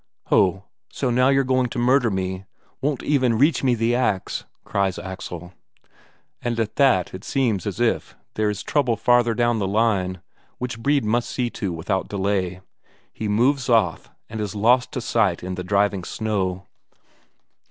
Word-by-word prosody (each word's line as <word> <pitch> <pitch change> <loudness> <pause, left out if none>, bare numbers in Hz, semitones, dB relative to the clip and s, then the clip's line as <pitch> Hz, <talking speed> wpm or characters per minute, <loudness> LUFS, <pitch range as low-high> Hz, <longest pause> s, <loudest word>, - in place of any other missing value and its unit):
"Ho, 95 0 +3 0.3
so 130 - -2 0.2
you're 135 0 +3
going 130 -1 +1
to - - -6
murder 125 0 +3
me 95 -1 -3 0.4
won't 140 -2 -1
even 130 -6 +2
reach 140 +3 +3
me 125 -2 +3
the 115 +1 +1
ax?" 115 -6 -1 0.2
cries 100 -2 -1
Axel. 90 -2 -7 0.9
And 120 -1 -2
at 110 -2 -2
that 130 -11 +3
it 95 +1 -8
seems 115 -8 0
as 100 - -4
if 120 -1 0 0.2
there 110 -1 0
is 105 -1 -4
trouble 130 -6 +1
farther 120 +1 +3
down 120 -1 +1
the 100 - 0
line, 100 -3 +1 0.4
which 125 -2 -4
Brede 140 +1 +1
must 120 +3 0
see 120 -2 -2
to 100 -4 -3
without 85 +3 -2
delay. 95 -2 -1 0.5
He 110 - -4
moves 125 +5 +2
off, 110 -8 +2 0.2
and 110 0 -5
is 105 0 -4
lost 120 +5 +3
to 125 - -2
sight 105 -8 +1
in 95 +1 -4
the 90 0 -4
driving 100 0 +1
snow. 95 -3 -2
110 Hz, 165 wpm, -23 LUFS, 95-125 Hz, 0.9 s, Ho